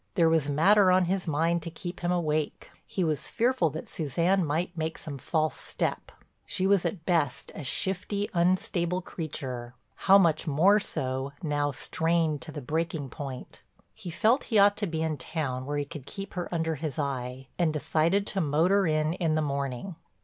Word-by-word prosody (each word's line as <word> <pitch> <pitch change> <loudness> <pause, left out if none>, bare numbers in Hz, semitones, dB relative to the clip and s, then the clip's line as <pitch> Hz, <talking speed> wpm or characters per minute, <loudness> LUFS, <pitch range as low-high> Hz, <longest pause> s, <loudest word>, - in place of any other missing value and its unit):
There 170 -4 +5
was 160 -3 +2
matter 190 +7 +5
on 185 0 +4
his 185 +1 -1
mind 165 +3 +1
to 170 - -5
keep 175 +2 -7
him 175 0 -1
awake; 155 -4 -1 0.2
he 185 - -1
was 155 -3 -1
fearful 235 -8 +2
that 155 +3 -6
Suzanne 170 +5 +1
might 170 +4 -1
make 160 0 -3
some 140 -4 -7
false 155 +3 0
step. - - -3 0.4
She 185 - -1
was 195 -2 +3
at 165 -2 -6
best 160 -8 0
a 155 - -7
shifty, 195 +8 -1
unstable 180 0 +1
creature, 125 -8 -6 0.2
how 195 +1 +5
much 165 -4 +2
more 180 +8 +5
so 130 -6 -3
now 145 -2 0
strained 160 +2 0
to 160 - -7
the 145 -3 -7
breaking 160 -1 -2
point. 135 -2 -7 0.3
He 175 - -8
felt 220 - +2
he 225 - +1
ought 205 0 +6
to 205 - -1
be 160 -1 -2
in 160 -2 -1
town 130 -4 -3
where 145 0 -1
he 145 - -1
could 145 -2 -9
keep 195 0 -7
her 180 -2 -4
under 165 -2 0
his 155 0 -4
eye, 130 -2 -3
and 170 -3 +3
decided 165 +6 +1
to 195 -2 -1
motor 170 +6 +3
in 155 0 +1
in 165 -3 0
the 155 - +2
morning. 140 +4 -3
160 Hz, 185 wpm, -28 LUFS, 145-180 Hz, 0.4 s, ought